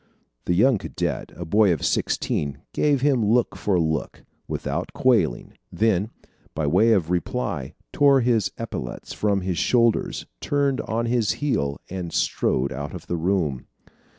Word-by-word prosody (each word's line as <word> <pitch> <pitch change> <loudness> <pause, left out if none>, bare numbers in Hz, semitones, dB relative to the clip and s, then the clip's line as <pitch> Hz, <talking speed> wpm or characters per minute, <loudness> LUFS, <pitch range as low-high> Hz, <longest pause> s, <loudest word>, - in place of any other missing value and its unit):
The 90 - +1
young 115 +3 +4
cadet, 80 -4 -3
a 85 - -6
boy 100 +4 +4
of 80 - -1
sixteen, 70 -1 -1
gave 145 -3 +2
him 135 -4 +3
look 115 +3 +2
for 95 -4 0
look, 80 -1 -2 0.2
without - - -3
quailing 105 - +1 0.2
then 110 -2 +1 0.5
by 80 - -1
way 95 +10 +4
of 90 -5 +1
reply 80 -8 -2 0.2
tore 140 -2 +5
his 115 -5 +1
epaulettes 110 - -6
from 100 -2 0
his 90 -2 -2
shoulders, 120 -2 +2
turned 140 -2 0
on 115 +1 -2
his 115 -2 +1
heel, 70 - -1
and 90 -2 -5
strode 65 +1 0
out 70 +2 -5
of - - -9
the 85 - -2
room. 80 -6 -1
100 Hz, 150 wpm, -24 LUFS, 80-115 Hz, 0.5 s, tore